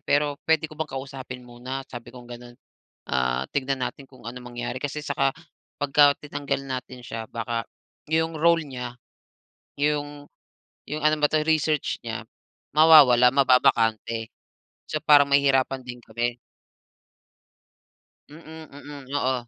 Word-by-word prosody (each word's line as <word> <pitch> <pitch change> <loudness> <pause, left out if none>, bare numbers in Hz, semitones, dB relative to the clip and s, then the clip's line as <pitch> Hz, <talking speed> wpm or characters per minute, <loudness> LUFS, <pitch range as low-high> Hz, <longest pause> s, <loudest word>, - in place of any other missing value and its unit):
pero, 145 0 +1
puwede 160 -1 +3
ko - - -10
bang 160 - -2
kausapin 130 -1 -7
muna?" 125 +3 -6
Sabi 120 -1 -9
kong 125 -1 -12
gano'n, 120 0 -10 0.6
ah, 65 0 +1
"Tignan 135 -1 -1
natin 140 - -7
kung 130 -3 -18
ano 125 +1 -7
mangyari, 120 +1 -5
kasi 145 +1 -3
saka 140 -2 +1 0.5
pagka 145 0 +5
tinanggal 140 -1 -3
natin 130 -1 -6
siya, 115 -2 -6
baka, 115 0 -3 0.4
yung 160 +1 0
role 170 0 +4
niya, 125 -2 -7 0.8
yung 145 0 -1 0.6
yung 150 +1 -4
ano 155 0 +4
ba - - +7
to, 155 -1 +2
research 155 -2 +1
niya, 110 -3 -5 0.5
mawawala, 145 -6 +8
mababakante". 115 -4 +2 0.6
So, 155 - -3
parang 145 -1 +6
mahihirapan 135 -1 +3
din 125 -1 -8
kami. 120 +2 -3 1.9
Mm, 160 +1 -12
mm. 145 0 -11 0.2
Oo, 130 -2 +1
135 Hz, 130 wpm, -25 LUFS, 120-145 Hz, 1.9 s, mawawala